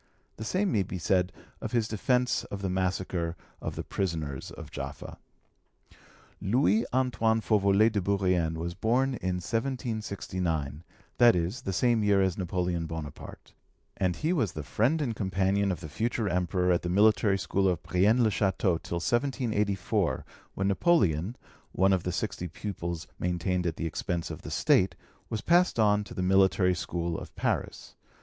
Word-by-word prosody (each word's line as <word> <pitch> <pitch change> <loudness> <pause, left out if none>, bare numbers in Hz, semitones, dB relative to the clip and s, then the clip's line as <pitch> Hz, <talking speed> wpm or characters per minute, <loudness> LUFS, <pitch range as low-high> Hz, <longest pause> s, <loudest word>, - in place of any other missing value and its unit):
The 110 - -5
same 190 - 0
may 105 - +2
be 95 - -4
said 90 +1 +1 0.3
of 110 - -5
his 115 -3 +2
defence 125 +4 +1
of 100 -1 -7
the 95 - -1
massacre 90 -2 -1 0.3
of - - -4
the - - -4
prisoners 80 -8 -3
of - - -10
Jaffa. - - -7 1.2
Louis 110 +1 +2
Antoine 120 -3 +2
Fauvelet 105 0 +3
de 100 - +1
Bourrienne 90 -4 +1
was 85 +1 -3
born 120 +8 +1
in 95 -7 -2
1769, 95 - -3 0.4
that 120 -3 +7
is, 90 +8 -1
in - - -18
the 95 - -1
same 120 +1 +2
year 100 -1 +4
as 95 -3 +2
Napoleon 90 -2 -2
Bonaparte, 80 -3 -8 0.4
and 90 -2 0
he 160 +3 0
was 115 - 0
the 75 - -5
friend 130 - +1
and 120 -5 -2
companion 95 0 +1
of 85 - -4
the - - -6
future 110 +8 -1
Emperor 90 0 +1
at 85 - +2
the 90 - -3
military 105 +1 +4
school 95 0 0
of 85 -2 -2
Brienne 105 +7 +3
le 110 - +3
Chateau 95 -4 +1
till - - -5
1784, 110 -1 0 0.3
when 95 - 0
Napoleon, 100 - +2 0.4
one 95 +1 +3
of 95 - +2
the 90 - -2
sixty 90 0 -3
pupils 85 -2 -5
maintained 90 0 -1
at 80 - -2
the - - -4
expense 85 +1 -3
of - - -7
the - - -8
State, - - +3 0.3
was 110 - -3
passed 175 +5 +3
on 105 -2 +3
to - - -10
the 90 - -2
Military 95 0 +4
School 85 -1 -3
of - - -11
Paris. - - -2
95 Hz, 165 wpm, -28 LUFS, 90-110 Hz, 1.2 s, that